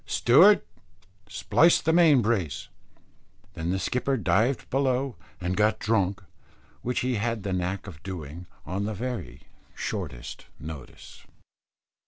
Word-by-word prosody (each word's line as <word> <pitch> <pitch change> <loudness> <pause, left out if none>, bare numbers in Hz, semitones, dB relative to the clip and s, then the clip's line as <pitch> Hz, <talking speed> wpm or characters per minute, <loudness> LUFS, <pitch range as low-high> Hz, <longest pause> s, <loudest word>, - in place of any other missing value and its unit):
"Steward, 175 - +6 0.7
splice 165 - +4
the 160 - +1
main 160 -7 +5
brace." 100 -9 -1 0.8
Then 80 +1 -4
the 95 - +1
skipper 125 +7 -1
dived 115 +4 +1
below 135 -2 0 0.2
and 90 +1 -2
got 105 +1 +2
drunk, 100 -4 0 0.6
which 125 +1 -1
he 125 -2 0
had 115 0 -2
the 95 - -2
knack 90 +2 -2
of 85 -6 -10
doing 85 -2 -7 0.2
on 95 +6 -3
the 110 0 -3
very 110 - -5 0.3
shortest 75 - -5
notice. 75 -4 -10
105 Hz, 125 wpm, -26 LUFS, 90-125 Hz, 0.8 s, Steward